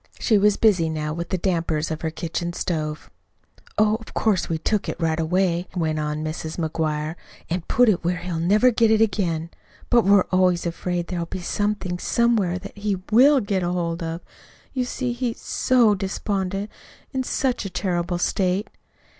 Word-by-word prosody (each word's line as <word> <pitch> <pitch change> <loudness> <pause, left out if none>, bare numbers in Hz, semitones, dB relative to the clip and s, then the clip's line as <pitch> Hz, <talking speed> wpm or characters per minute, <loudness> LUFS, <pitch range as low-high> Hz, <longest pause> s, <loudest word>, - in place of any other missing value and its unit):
She 215 -4 +3
was 205 0 +4
busy 185 -7 +3
now 155 -1 -2
with 170 +1 -5
the 185 - 0
dampers 165 -4 -1
of 155 - -4
her 160 - -1
kitchen 170 +1 -4
stove. 155 -3 -3 0.7
"Of 215 +1 +1
course 210 -5 +1
we 165 - 0
took 205 +6 -1
it - - -5
right 165 -1 0
away," 175 +1 +1
went 160 -3 0
on 150 0 -2
Mrs. 155 0 -5
McGuire, 155 -2 -1 0.4
"an' 175 +1 0
put 245 0 +4
it 205 -5 +2
where 175 +1 0
he'll 175 -2 -4
never 210 +9 +4
get 230 -1 +3
it 220 0 +4
again. 175 -6 0 0.4
But 240 -2 +5
we're 200 -1 +5
always 185 -2 +3
afraid 175 +1 -2
there'll 170 -1 -3
be 185 - -5
somethin' 200 -2 -2
somewhere 220 -7 +1
that 200 +2 -9
he 205 -1 0 0.2
WILL 270 +5 +6
get 200 -2 -1
hold 175 -1 -1
of. 165 +1 -4 0.5
You 255 -2 0
see, 250 0 -2
he's 240 -1 -3
SO 240 -4 +3
despondent 195 0 -2 0.4
in 265 - 0
such 260 0 -1
a - - -3
terrible 175 -1 -1
state!" 185 +3 0
180 Hz, 170 wpm, -23 LUFS, 165-210 Hz, 0.7 s, WILL